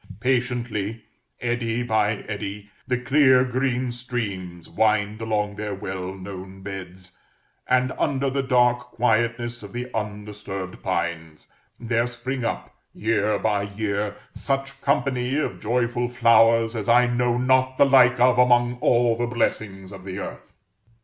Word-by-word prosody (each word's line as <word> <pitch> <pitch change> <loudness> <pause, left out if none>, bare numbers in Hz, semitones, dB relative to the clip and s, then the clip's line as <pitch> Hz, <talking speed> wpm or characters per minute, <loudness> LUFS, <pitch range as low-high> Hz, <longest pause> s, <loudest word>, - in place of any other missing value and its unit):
Patiently, 120 -4 -1 0.4
eddy 120 0 -1
by 110 -2 0
eddy, 100 -1 -6 0.2
the 125 -2 +1
clear 130 0 +4
green 125 0 -1
streams 100 -8 -5
wind 110 0 +1
along 105 -2 -1
their 105 -1 -3
well 95 -1 -5
known 95 0 -9
beds; 95 -1 -9 0.5
and 130 0 +2
under 140 -1 0
the 135 +1 0
dark 125 -2 +3
quietness 120 0 0
of 100 -2 -11
the 125 +1 -5
undisturbed 105 -3 -5
pines, 85 -3 -3 0.3
there 120 0 0
spring 130 +1 -4
up, 115 - -3 0.2
year 110 -1 +1
by 105 -2 0
year, 100 0 -2 0.2
such 135 0 -3
company 135 -2 0
of 155 - -2
joyful 120 +1 0
flowers 115 -1 +4
as 110 0 -3
I 120 +1 +6
know 120 0 +1
not 130 +1 +2
the - - +6
like 125 -2 +5
of 125 0 +4
among 120 0 +4
all 120 -1 +3
the 120 +1 -1
blessings 105 -5 -2
of 95 -2 -10
the 95 0 -6
earth. - - -7
115 Hz, 135 wpm, -24 LUFS, 105-125 Hz, 0.5 s, I